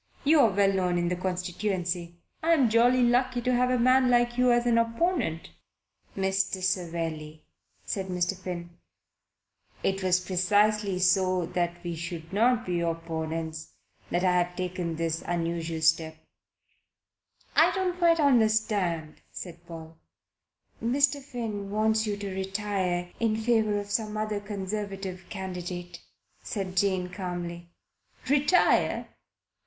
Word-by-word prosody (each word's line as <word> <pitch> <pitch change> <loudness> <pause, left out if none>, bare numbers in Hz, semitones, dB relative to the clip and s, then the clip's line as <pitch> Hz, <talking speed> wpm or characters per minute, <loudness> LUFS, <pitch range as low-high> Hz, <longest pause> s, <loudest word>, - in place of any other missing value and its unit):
You're 285 -5 +5
well 195 0 +2
known 180 -2 +1
in 175 0 0
the 180 - 0
constituency 180 -1 -3 0.2
I 330 +1 +3
am 265 -8 +3
jolly 245 +2 +4
lucky 245 +1 +2
to 250 +1 +1
have 250 +1 +2
a 255 - +2
man 255 +1 +4
like 240 0 +3
you 250 0 +4
as 240 0 +2
an 235 -1 +4
opponent." 230 - -1 0.7
"Mr. 190 -1 0
Savelli," 165 -4 -3 0.4
said 190 -2 -3
Mr. 180 +1 -1
Finn, 175 -2 -6 1.1
"it 195 0 0
was 185 -1 +3
precisely 205 +2 +1
so 185 -1 +2
that 175 0 -2
we 170 -1 -3
should 165 +1 -7
not 240 +3 +3
be 180 -1 -1
opponents 165 -1 -4 0.4
that 175 +1 0
I 185 - +4
have 175 0 -4
taken 180 -2 -3
this 165 0 -2
unusual 165 -1 -2
step." 160 0 +2 1.4
"I - - +6
don't 365 -2 -1
quite 335 -1 +4
understand," 215 - +1
said 175 -2 -9
Paul. 165 -1 -10 0.8
"Mr. 280 +4 +2
Finn 225 -7 -5
wants 220 +1 +1
you 205 -1 -2
to 200 -2 -5
retire 190 -2 -2
in 225 -2 +1
favour 220 -2 +2
of 205 0 -5
some 215 0 -1
other 215 -1 -1
Conservative 195 -2 -5
candidate," 180 -2 -6 0.4
said 190 -4 -4
Jane 185 -1 +1
calmly. 175 -2 -6 0.6
"Retire? 290 +6 +3
190 Hz, 130 wpm, -27 LUFS, 175-225 Hz, 1.4 s, I